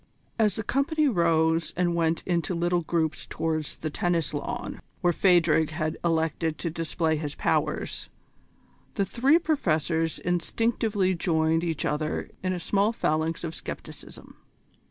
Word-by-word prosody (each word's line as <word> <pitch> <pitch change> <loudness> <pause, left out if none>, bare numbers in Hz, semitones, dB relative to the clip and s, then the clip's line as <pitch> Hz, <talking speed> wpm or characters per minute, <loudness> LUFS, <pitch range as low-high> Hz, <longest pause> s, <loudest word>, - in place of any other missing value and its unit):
As 215 -2 +3
the 220 - -3
company 295 +6 +1
rose 165 - +2
and 175 -1 +2
went 165 -1 +1
in 175 -2 +1
little 175 0 +1
groups 160 -1 -1
towards 155 -2 -2
the 155 - -4
tennis 170 -2 0
lawn, 240 +11 -4 0.2
where 175 -2 +3
Phadrig 165 -4 +4
had 155 0 -2
elected 160 -1 0
to 170 - -3
display 160 0 -1
his 150 -1 -4
powers, - - -1 0.9
the 200 - +1
three 265 - +4
Professors 165 - 0
instinctively 205 +2 0
joined 165 -2 +1
each 165 -3 -2
other 155 +1 -2
in 185 - -1
a 180 - -2
small 200 +5 +2
phalanx 160 -6 -1
of 165 -1 -3
scepticism. - - -9
170 Hz, 135 wpm, -27 LUFS, 160-190 Hz, 0.9 s, Phadrig